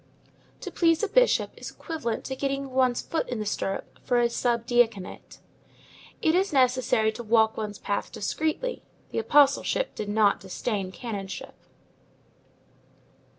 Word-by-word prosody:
To - - -6
please 330 0 +2
a - - +2
bishop - - +3
is - - -7
equivalent 250 -9 -4
to 265 - -4
getting 275 0 -2
one's 255 -2 +2
foot 325 - -2
in 245 - -2
the 215 - -3
stirrup 195 -1 -3
for 245 -1 +2
a 235 0 +2
sub 235 -1 0
diaconate. 230 -6 0 0.9
It 320 - +4
is 380 +3 +2
necessary 255 -5 +3
to 230 - -8
walk 220 0 +3
one's 210 -2 -4
path 200 - -3
discreetly; 310 - -2 0.3
the - - -1
apostleship 280 - +3
does 210 - -5
not 205 -1 +3
disdain 195 0 -3
the 185 - -13
canonship. 200 -5 -6
240 Hz, 145 wpm, -26 LUFS, 215-280 Hz, 0.9 s, It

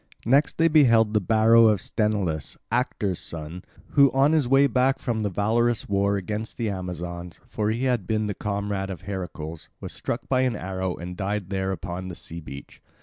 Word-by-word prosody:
Next 135 +6 +3
they 165 - +4
beheld 115 -9 +5
the 105 - +4
barrow 115 +3 +5
of 105 -3 +3
Sthenelus, 100 - -1
Actor's 105 -7 -1
son, 80 +2 -7 0.3
who 140 -2 +5
on 135 +3 +4
his 155 -5 +2
way 135 +2 +5
back 130 +1 +2
from 115 -3 -2
the 105 - 0
valorous 115 +5 +1
war 100 0 +1
against 105 +3 -4
the 115 -3 -1
Amazons—for 90 +2 -5
he 115 +4 -1
had 125 -8 0
been 110 -1 0
the 105 - -2
comrade 100 -1 -3
of 95 -3 -6
Heracles—was 85 -5 -7
struck 115 - -4
by 130 -1 +2
an 130 -3 +1
arrow 95 -2 -3
and 90 +1 -7
died 100 0 -3
there 95 0 -1
upon 90 0 -5
the 90 - -6
sea 85 +1 -8
beach. 70 -3 -11
105 Hz, 180 wpm, -25 LUFS, 90-115 Hz, 0.3 s, beheld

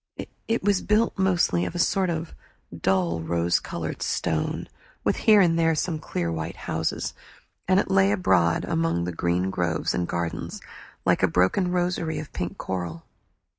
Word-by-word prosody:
It 225 -2 0
was 200 -1 +2
built 215 +2 +2
mostly 175 - +2
of 165 - -4
a - - -1
sort 185 +1 +2
of 165 -1 -3 0.4
dull 85 -1 +1
rose 85 +1 +1
colored - - -5
stone, 80 -1 -1 0.4
with - - +2
here 210 -2 +5
and 170 -2 +3
there 165 -1 +3
some 160 0 -1
clear 85 - -3
white 80 0 -4
houses; 80 0 -2 0.5
and - - +4
it - - -1
lay 95 +1 +4
abroad 90 -4 +2
among 80 +1 0
the 90 - -2
green 90 +2 0
groves 85 -4 -1
and 85 - -1
gardens 85 -1 -3 0.5
like - - +3
a - - +5
broken 95 - +2
rosary 175 -2 -1
of 150 - -7
pink 90 +1 -4
coral. 85 -3 -4
95 Hz, 165 wpm, -25 LUFS, -, 0.5 s, here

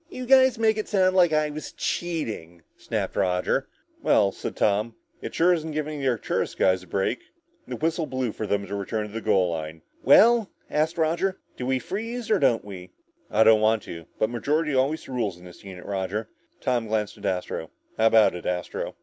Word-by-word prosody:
"You 255 -8 -6
guys 260 -1 +5
make 220 -1 +2
it 215 - -3
sound 185 -2 +2
like 175 -3 +5
I 155 -1 +1
was 155 +1 -7
cheating," 110 - -4
snapped - - -4
Roger. 90 -1 0 0.3
"Well," 100 -2 +3
said - - -6
Tom, 105 +3 +1 0.3
"it - - -6
sure 180 +2 +4
isn't 160 -2 -3
giving 150 0 -3
the 135 - -1
Arcturus 120 -4 -1
guys 95 0 +2
a 90 - -15
break." 100 +7 -1 0.5
The - - -4
whistle 160 0 -1
blew 130 -3 -2
for 110 - -5
them 100 0 0
to 100 - -8
return 105 +2 -2
to 105 - -11
the 115 - -4
goal 95 -5 +2
line. 80 0 -6 0.2
"Well," 225 - +6 0.2
asked 155 +3 0
Roger, 170 +4 0 0.2
"do 125 - -5
we 130 0 +2
freeze 225 - -5
or 210 - +4
don't 125 -7 +2
we?" 90 -3 -9 0.4
"I 110 - +4
don't 110 -1 +6
want 110 0 +2
to. 85 -1 -9
But 110 - 0
majority 150 +5 0
always 135 +4 0
rules 115 -9 -2
in 90 - -15
this 90 - -14
unit, 95 -2 -10
Roger." 100 +3 -3 0.3
Tom 120 -3 0
glanced 105 -1 -2
at 100 - -9
Astro. 90 -3 -3 0.3
"How 110 - +5
about 110 -1 +5
it, 90 - -6
Astro?" 90 -1 -3
115 Hz, 200 wpm, -25 LUFS, 100-160 Hz, 0.5 s, Well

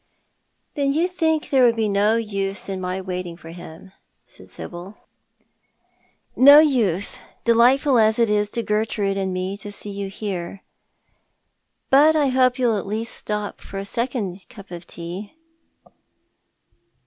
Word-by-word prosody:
" - - -48
Then 280 -1 0
you 330 +4 +2
think 320 -4 -1
there 265 -2 +4
would 235 -1 +4
be 220 -1 0
no 205 +2 +2
use 200 -3 -3
in 190 -1 -4
my 185 +1 -3
waiting 180 -2 -5
for 165 -1 -11
iiim?" 175 +2 -12 0.3
said - - -14
Sibyl. 180 +4 -9 1.4
"No 285 +3 +9
use 230 - +2
— - - -37
delightful 245 +3 +4
as 220 0 +3
it 235 -1 +3
is 210 -1 +1
to 235 +2 -3
Gertrude 210 -2 -1
and 190 -1 -2
me 185 +1 -3
to 205 0 -8
see 205 0 -5
you 200 0 -5
here. 195 -2 -6 1.3
But 300 +4 +6
I 290 -3 +2
hope 255 -1 +3
you'll 235 -5 +1
at 195 - -8
least 220 +3 -3
stop 210 -1 -5
for 195 - -9
a 195 - -4
second 215 -5 -3
cup 200 -6 -14
of 175 0 -9
tea." 180 - -8
210 Hz, 155 wpm, -22 LUFS, 190-245 Hz, 1.4 s, No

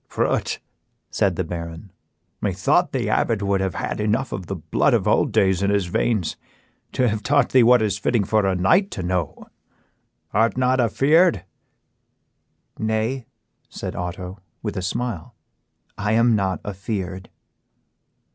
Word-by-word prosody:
"Prut," - - 0 0.5
said 95 -3 +1
the 95 - -1
Baron, 85 +2 -7 0.5
"methought - - +1
the - - -1
abbot 110 -3 +1
would 100 -1 +1
have 95 -3 -2
had - - -3
enough 110 +6 0
of 90 -3 -5
the 95 - -3
blood 80 - +1
of - - 0
old - - +2
days 95 -1 +2
in 100 - +1
his 100 -2 +1
veins 95 +1 -1 0.6
to 125 - +2
have 110 -1 -1
taught 140 +5 +2
thee 130 - +5
what 120 0 +5
is 105 -1 -1
fitting 110 +1 +1
for 105 0 +1
a 95 - +1
knight 170 - +3
to 95 - -5
know; 90 -3 -2 0.9
art 115 +4 +2
not 130 0 +2
afeared?" 135 - +3 1.3
"Nay," 110 +3 -1 0.4
said - - -6
Otto, 90 +2 -5 0.2
with 105 -2 -3
a 95 - -2
smile, 95 -1 -4 0.6
"I 105 +1 0
am 115 0 +4
not 95 -2 -1
afeared." 95 -2 -5
100 Hz, 145 wpm, -22 LUFS, 95-115 Hz, 1.3 s, thee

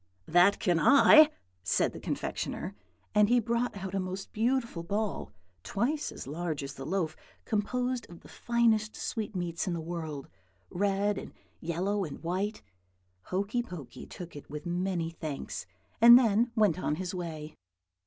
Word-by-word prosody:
"'That 175 +4 +5
can 175 -2 +1
I!' 290 - +8 0.3
said - - +1
the - - -8
confectioner; 100 - -3 0.4
and 210 0 +5
he 245 0 +5
brought 235 0 -1
out 190 -1 -6
a 195 - 0
most 185 +1 -5
beautiful 230 -4 0
ball, 205 +5 -2 0.3
twice 245 - -1
as - - -8
large 155 0 -3
as 140 0 -6
the 135 0 -8
loaf, 165 -3 -1 0.3
composed 245 +3 -1
of 170 -1 -12
the - - -15
finest 225 -2 +1
sweetmeats 180 -7 -3
in 180 - 0
the 170 - -2
world, 160 -4 -5 0.4
red 200 +2 +1
and - - -10 0.2
yellow 185 +5 -1
and 155 -2 -7
white. 190 - -2 0.6
Hokey 200 +6 -1
Pokey 180 - -9
took 175 -3 -9
it 145 - -10
with 150 0 -7
many 175 -1 -1
thanks, 155 - -6 0.3
and 235 +1 +11
then 235 -1 +3
went 210 -7 +3
on 150 - 0
his 180 +2 -4
way. 160 -4 -5
190 Hz, 155 wpm, -30 LUFS, 165-220 Hz, 0.6 s, and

